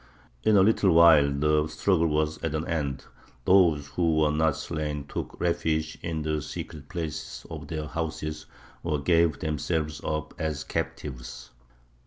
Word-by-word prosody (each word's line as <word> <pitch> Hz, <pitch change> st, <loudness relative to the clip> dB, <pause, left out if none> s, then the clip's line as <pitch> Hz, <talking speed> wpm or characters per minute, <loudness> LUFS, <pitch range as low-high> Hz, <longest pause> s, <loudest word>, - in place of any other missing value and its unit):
In 110 Hz, -1 st, +4 dB
a 95 Hz, -, +7 dB
little 100 Hz, -2 st, +4 dB
while 80 Hz, -4 st, +7 dB
the 75 Hz, +2 st, +2 dB
struggle 80 Hz, +2 st, +1 dB
was 75 Hz, 0 st, 0 dB
at 80 Hz, -2 st, -1 dB
an 80 Hz, +1 st, -2 dB
end. 70 Hz, -5 st, -2 dB, 0.4 s
Those 85 Hz, -6 st, +5 dB
who 85 Hz, +1 st, +1 dB
were 75 Hz, -1 st, +3 dB
not 80 Hz, -1 st, +2 dB
slain 75 Hz, -3 st, -3 dB
took -, -, -6 dB
refuge 80 Hz, -2 st, 0 dB
in 80 Hz, -2 st, -3 dB
the 75 Hz, -1 st, -1 dB
secret 75 Hz, -1 st, -7 dB
places 80 Hz, -2 st, -5 dB
of 75 Hz, -2 st, -7 dB
their 75 Hz, -1 st, -4 dB
houses, 75 Hz, -1 st, -4 dB, 0.3 s
or 80 Hz, -3 st, -1 dB
gave 80 Hz, +1 st, +3 dB
themselves 75 Hz, -1 st, -2 dB
up 75 Hz, -1 st, -3 dB
as 80 Hz, -1 st, -2 dB
captives. 60 Hz, -3 st, -5 dB
80 Hz, 150 wpm, -27 LUFS, 75-80 Hz, 0.4 s, a